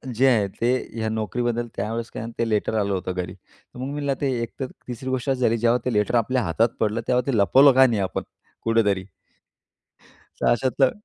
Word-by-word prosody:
जे 135 Hz, +3 st, +4 dB
आहे, 110 Hz, -6 st, +3 dB
ते 120 Hz, +5 st, -1 dB, 0.2 s
ह्या 110 Hz, -1 st, -2 dB
नोकरीबद्दल 120 Hz, +2 st, -2 dB
त्यावेळेस 115 Hz, +3 st, -3 dB
काय 110 Hz, -, -5 dB
ते 115 Hz, -, +1 dB
लेटर 105 Hz, +1 st, 0 dB
आलं 100 Hz, -1 st, 0 dB
होतं 95 Hz, 0 st, -2 dB
घरी. 90 Hz, 0 st, -4 dB
तर 110 Hz, -, -19 dB
मग 135 Hz, +2 st, -4 dB
मी 140 Hz, -1 st, 0 dB
ते 140 Hz, -, +1 dB
एकतर 130 Hz, +3 st, -4 dB, 0.2 s
3री 125 Hz, +2 st, -5 dB
गोष्ट 130 Hz, +1 st, -2 dB
अशी 130 Hz, -1 st, 0 dB
झाली 115 Hz, -1 st, +3 dB
जेव्हा 120 Hz, +2 st, +3 dB
ते 125 Hz, -, 0 dB
लेटर 105 Hz, +3 st, +1 dB
आपल्या 125 Hz, +2 st, +2 dB
हातात 110 Hz, +8 st, +2 dB
पडलं 110 Hz, +1 st, 0 dB
तेव्हा 125 Hz, 0 st, +3 dB
ते 115 Hz, -, +1 dB
लपवलं 135 Hz, +8 st, +6 dB
का 130 Hz, +1 st, +7 dB
नाही 110 Hz, -4 st, 0 dB
आपण, 95 Hz, -, -2 dB, 0.4 s
कुठेतरी? 105 Hz, -5 st, +1 dB, 1.4 s
तर -, -, +1 dB
अशातलं 130 Hz, +2 st, +2 dB
115 Hz, 195 wpm, -23 LUFS, 105-125 Hz, 1.4 s, का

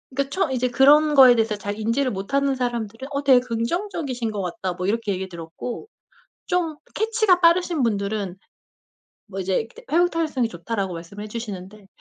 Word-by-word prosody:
그니까 275 Hz, 0 st, 0 dB
처음 310 Hz, -3 st, 0 dB
이제 255 Hz, -1 st, 0 dB
그런 295 Hz, +4 st, +5 dB
거에 255 Hz, -3 st, +9 dB
대해서 225 Hz, -2 st, +1 dB
잘 205 Hz, 0 st, -5 dB
인지를 230 Hz, +5 st, 0 dB
못하는 275 Hz, +8 st, 0 dB
사람들은 240 Hz, 0 st, -3 dB
"어 280 Hz, 0 st, -2 dB
되게 260 Hz, -3 st, +6 dB
긍정적이신 250 Hz, -, -3 dB
것 205 Hz, -, -3 dB
같다." 180 Hz, 0 st, -3 dB
뭐 180 Hz, +1 st, -4 dB
이렇게 225 Hz, 0 st, 0 dB
얘기 190 Hz, 0 st, -4 dB
들었고 170 Hz, -, -7 dB, 0.6 s
좀 340 Hz, -4 st, 0 dB, 0.2 s
캐치가 435 Hz, -4 st, +2 dB
빠르신 340 Hz, -2 st, +3 dB
분들은 200 Hz, -3 st, -2 dB, 0.9 s
뭐 195 Hz, -2 st, -6 dB
이제 190 Hz, +4 st, 0 dB, 0.3 s
"회복 350 Hz, +2 st, +4 dB
탄력성이 300 Hz, -9 st, -1 dB
좋다."라고 190 Hz, +1 st, -4 dB
말씀을 170 Hz, +5 st, -8 dB
해 215 Hz, -, -8 dB
주시는데 210 Hz, -3 st, -7 dB
235 Hz, 380 characters per minute, -23 LUFS, 200-285 Hz, 0.9 s, 거에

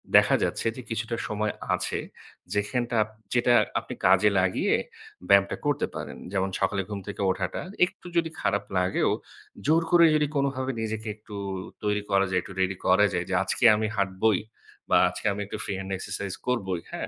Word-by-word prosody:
দেখা -, -, +7 dB
যাচ্ছে -, -, -1 dB
যে 130 Hz, -, -7 dB
কিছুটা 115 Hz, 0 st, -2 dB
সময় 105 Hz, 0 st, -1 dB, 0.2 s
আছে, -, -, -2 dB, 0.5 s
যেখানটা 115 Hz, +4 st, -1 dB, 0.4 s
যেটা 120 Hz, 0 st, +4 dB, 0.3 s
আপনি -, -, -8 dB
কাজে 95 Hz, +3 st, +6 dB
লাগিয়ে 95 Hz, 0 st, +2 dB, 0.5 s
ব্যায়ামটা 100 Hz, 0 st, +5 dB
করতে 145 Hz, -1 st, +1 dB
পারেন। -, -, -6 dB
যেমন 95 Hz, -1 st, 0 dB
সকালে 100 Hz, +1 st, +1 dB
ঘুম 100 Hz, -1 st, -4 dB
থেকে 100 Hz, -, -5 dB
ওঠাটা, 90 Hz, -2 st, -3 dB, 0.2 s
একটু 180 Hz, -, -12 dB
যদি 165 Hz, -1 st, +2 dB
খারাপ 100 Hz, +1 st, +1 dB
লাগেও 90 Hz, +1 st, +2 dB, 0.6 s
জোর 160 Hz, +2 st, +5 dB
করে 170 Hz, -1 st, +7 dB
যদি 150 Hz, -1 st, +2 dB
কোনোভাবে 135 Hz, -1 st, 0 dB
নিজেকে 110 Hz, 0 st, -3 dB
একটু 105 Hz, -1 st, -12 dB, 0.5 s
তৈরি 105 Hz, 0 st, +1 dB
করা 100 Hz, 0 st, +4 dB
যায়, 90 Hz, -1 st, +2 dB
একটু 95 Hz, -, -10 dB
ready 95 Hz, 0 st, +1 dB
করা 100 Hz, +3 st, +5 dB
যায় 90 Hz, -1 st, -1 dB
যে, -, -, -2 dB
"আজকে 95 Hz, -, -2 dB
আমি 110 Hz, 0 st, 0 dB
হাঁটবোই 100 Hz, +1 st, +2 dB, 0.5 s
বা -, -, +5 dB
আজকে -, -, -8 dB
আমি 100 Hz, -, -3 dB
একটু 105 Hz, -, -6 dB
free 100 Hz, -, -3 dB
hand 95 Hz, 0 st, -6 dB
exercise 95 Hz, 0 st, -4 dB
করবোই," 95 Hz, -9 st, -1 dB
হ্যাঁ? -, -, -4 dB
105 Hz, 170 wpm, -26 LUFS, 95-120 Hz, 0.6 s, দেখা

